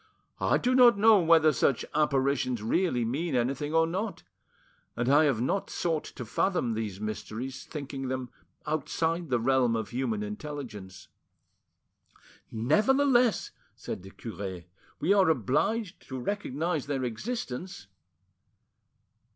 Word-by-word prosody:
I - - +2
do 250 0 +1
not 245 -4 +7
know 215 0 +6
whether 160 -2 +5
such 130 0 +1
apparitions 135 -5 +1
really 125 -1 +1
mean 145 +6 -2
anything 135 +4 -1
or 165 0 +4
not, 190 +6 -4 0.7
and 120 +1 -1
I 145 +3 +5
have 135 -7 +1
not 190 +10 -1
sought 165 -3 -1
to 125 - -8
fathom 125 - 0
these 105 -4 -4
mysteries, 110 +5 -5
thinking 140 -3 -6
them 130 -1 -4 0.3
outside 160 +2 -1
the 125 -2 +2
realm 125 -1 +2
of 110 -1 -3
human 120 -4 -2
intelligence." 105 -4 -7 1.4
"Nevertheless," 240 - +3 0.2
said - - -6
the 95 - -11
cure, 95 -3 -7 0.4
"we 180 +6 +3
are 195 -4 +4
obliged 160 - 0
to 130 - -5
recognise 160 -1 -2
their 135 -2 -2
existence." 175 - -5
140 Hz, 125 wpm, -28 LUFS, 120-170 Hz, 1.4 s, not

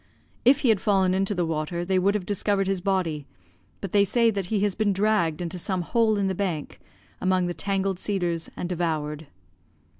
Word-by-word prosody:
If 270 +4 +5
he 260 - +2
had 210 -4 +3
fallen 190 -3 +2
into 195 +2 0
the 175 -1 0
water, 165 +2 -2
they 185 0 +2
would 200 +3 +2
have 200 -4 -2
discovered 200 0 0
his 195 -1 -1
body, 175 -7 -1 0.5
but 195 - -5
they 200 -1 +5
say 230 +3 +3
that 195 -3 -3
he 205 0 0
has 205 -1 +1
been 205 0 +1
dragged 190 -5 +1
into 175 +1 -5
some 185 0 -1
hole 220 +2 +2
in 200 - 0
the 190 - 0
bank 175 -6 -3 0.4
among 185 -1 +2
the 175 - -2
tangled 195 -1 -1
cedars 175 -5 -2
and 175 - -3
devoured. 160 -3 -2
190 Hz, 200 wpm, -25 LUFS, 175-200 Hz, 0.5 s, If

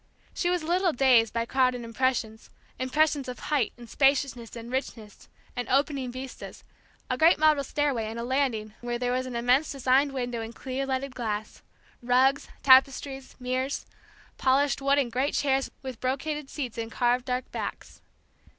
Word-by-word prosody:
She 350 - 0
was 355 -2 0
a - - -6
little 355 +1 +2
dazed 245 -4 +4
by 230 0 -1
crowded 255 -1 +1
impressions; 230 -2 -2 0.3
impressions 285 +2 +1
of 250 - -5
height 285 -7 0
and 240 -1 -11
spaciousness 270 -3 +1
and 235 +1 -8
richness, 225 -5 -5 0.3
and 245 - -4
opening 270 -1 +1
vistas; 260 +1 -8 0.4
a 255 - -2
great 330 +3 +6
marble 305 -2 +4
stairway, 275 -5 -1
and 220 +1 -5
a 235 - -3
landing 240 -5 -1
where 240 0 -2
there 245 0 -1
was 255 +1 -1
an 250 - -6
immense 250 +5 +2
designed 275 +1 +2
window 245 -3 -3
in 225 +1 -7
clear 265 +2 -4
leaded 265 0 -2
glass; 215 -4 -4 0.4
rugs, 255 +3 +3 0.2
tapestries, 270 0 +4
mirrors, 255 +2 -2 0.5
polished 275 +2 +2
wood 275 +1 +3
and 260 -4 +1
great 260 +5 0
chairs 270 -1 +1
with 260 -3 -7
brocaded 275 +2 -2
seats 250 -6 -5
and 225 0 -4
carved 245 +1 +1
dark 250 -1 -3
backs. - - -6
260 Hz, 165 wpm, -27 LUFS, 240-275 Hz, 0.5 s, great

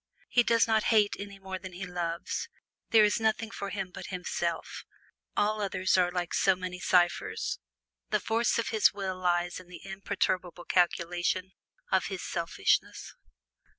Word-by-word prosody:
He 245 - +5
does 230 -1 +3
not 220 -1 +2
hate 210 -3 +4
any 200 0 -7
more 190 -1 -6
than 185 -1 -9
he 185 +2 -5
loves; 175 -1 -3 0.4
there 220 -2 +7
is 210 +3 +3
nothing 220 0 0
for 200 -2 -5
him 195 -3 -4
but - - -8
himself; 180 -2 -3 0.5
all 210 +1 +2
other 190 -2 -3
things - - +5
are 180 -1 +1
so 190 0 +4
many 180 0 -5
ciphers. 175 -1 +1 0.5
The - - +2
force 230 +2 +1
of 230 - 0
his 220 -2 +4
will 190 -2 -4
lies 175 -1 0
in 185 - -14
the 175 -1 -11
imperturbable 185 -2 -2
calculation 175 +1 +1 0.4
of 190 -1 +3
his 190 -2 -5
selfishness. 165 - 0
185 Hz, 155 wpm, -29 LUFS, 180-205 Hz, 0.5 s, there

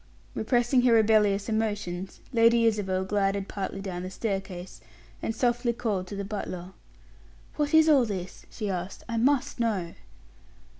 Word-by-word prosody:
Repressing 245 +3 +2
her 245 -1 +4
rebellious 210 -2 +4
emotions, 205 -5 -2
Lady 230 0 +5
Isabel 190 -4 +1
glided 195 0 0
partly 195 -1 -4
down 185 -3 -5
the 185 - -5
staircase, 190 - -4 0.4
and 225 - -2
softy 240 0 +1
called 205 -6 -2
to 200 - -6
the 200 0 -4
butler. 190 -3 -5 0.9
"What 295 +1 +1
is 315 0 +7
all 280 -6 +5
this?" 185 -4 -6
she 215 - -5
asked. 185 -1 -4
"I 230 - -2
must 275 +2 +1
know." 200 -8 -1
210 Hz, 145 wpm, -27 LUFS, 190-235 Hz, 0.9 s, is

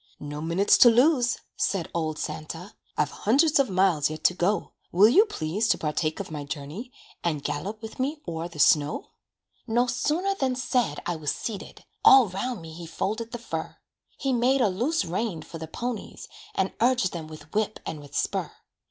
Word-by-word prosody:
"No 145 0 -6
minutes 170 +5 +3
to 240 - +9
lose," 245 +1 +4 0.2
said 190 -5 0
old 155 -2 -1
Santa, 165 +4 -6 0.2
"I've 150 -1 +1
hundreds 285 +8 +3
of 275 - +3
miles 185 -6 +3
yet 155 0 -7
to - - +5
go. 185 +4 0 0.2
Will 195 +5 +7
you 400 - +6
please 190 - -1
to - - +3
partake 155 0 -1
of 200 - -6
my 150 -2 -4
journey, 150 - -6 0.3
And 155 -5 -1
gallop 195 +10 -4
with 220 - -8
me 285 +4 -1
o'er 165 0 -3
the 170 -3 -13
snow?" 150 0 +3 0.6
No 240 +2 +3
sooner 310 +10 0
than 265 -9 0
said 245 - 0
I 175 -2 -1
was 150 -2 -3
seated, 210 -4 -7 0.2
All 265 -6 +8
'round 195 +1 -3
me 160 -1 -9
he 170 0 -8
folded 220 +7 -3
the - - -4
fur. 165 -9 -5 0.4
He 270 -2 0
made 250 +3 +3
a 220 - +4
loose 250 - 0
rein 180 0 -2
for 165 - -9
the 160 - -6
ponies, 240 +5 -5 0.3
And 190 0 0
urged 245 -6 +3
them 165 -3 -5
with 155 0 -12
whip 215 0 0
and 155 - -5
with 145 - -12
spur. - - -1
195 Hz, 185 wpm, -26 LUFS, 160-245 Hz, 0.6 s, to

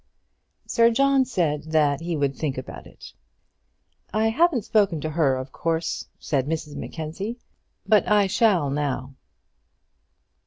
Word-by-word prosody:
Sir 230 0 +4
John 275 +2 +3
said 160 - -1
that 150 -2 +1
he 170 -1 -2
would 140 -1 0
think 140 -3 -3
about 130 - -8
it. - - -14 1.0
"I 220 +2 +2
haven't 265 - +2
spoken 200 -7 +2
to 155 - -3
her, 150 -4 +2
of 130 +1 -6
course," 165 0 -2
said 140 -3 -1
Mrs 155 -2 -4
Mackenzie; 180 +9 -5 0.5
"but 215 -2 +3
I 210 -1 +4
shall 190 -7 +2
now." 135 -2 -2
165 Hz, 130 wpm, -24 LUFS, 145-215 Hz, 1.0 s, Sir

